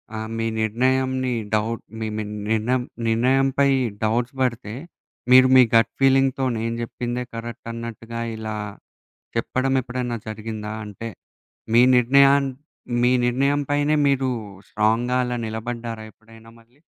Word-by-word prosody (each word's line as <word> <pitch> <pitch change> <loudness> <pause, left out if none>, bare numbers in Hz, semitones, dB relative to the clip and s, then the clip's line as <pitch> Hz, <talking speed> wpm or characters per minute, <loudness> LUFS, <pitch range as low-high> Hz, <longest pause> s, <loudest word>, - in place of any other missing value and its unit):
ఆహ్, 110 0 -4
మీ 115 0 -1
నిర్ణయంని 130 +3 +1 0.2
డౌట్ 110 +2 0 0.2
మీ, 110 - -2
మీ 110 - -2 0.3
నిర్ణయం 120 +3 +1 0.2
నిర్ణయంపై 135 +4 +2 0.3
డౌట్స్ 120 +4 0
పడితే 115 -4 -1 0.6
మీరు 130 0 +8
మీ 130 - +9
గట్ 115 0 +4
ఫీలింగ్‌తోనే 135 -2 +2
నేను 115 0 -2
చెప్పిందే 120 +1 -4
కరెక్ట్ 115 0 -7
అన్నట్టుగా 115 0 -7 0.2
ఇలా 110 -1 -5 0.8
చెప్పడం 130 +1 0
ఎప్పుడైనా 125 -1 -3
జరిగిందా? 110 0 -6
అంటే, 105 +2 -7 0.6
మీ 120 +1 +7
నిర్ణయాన్ 140 +3 +5 0.5
మీ 125 +1 +4
నిర్ణయం 140 +4 +1
పైనే 145 +1 +2
మీరు 135 -1 +1 0.4
స్ట్రాంగ్‌గా 115 +4 +1
అలా 125 0 -2
నిలబడ్డారా 115 0 -5
ఎప్పుడైనా 115 +1 -17
మళ్ళీ? 120 +5 -27
120 Hz, 120 wpm, -23 LUFS, 115-130 Hz, 0.8 s, మీ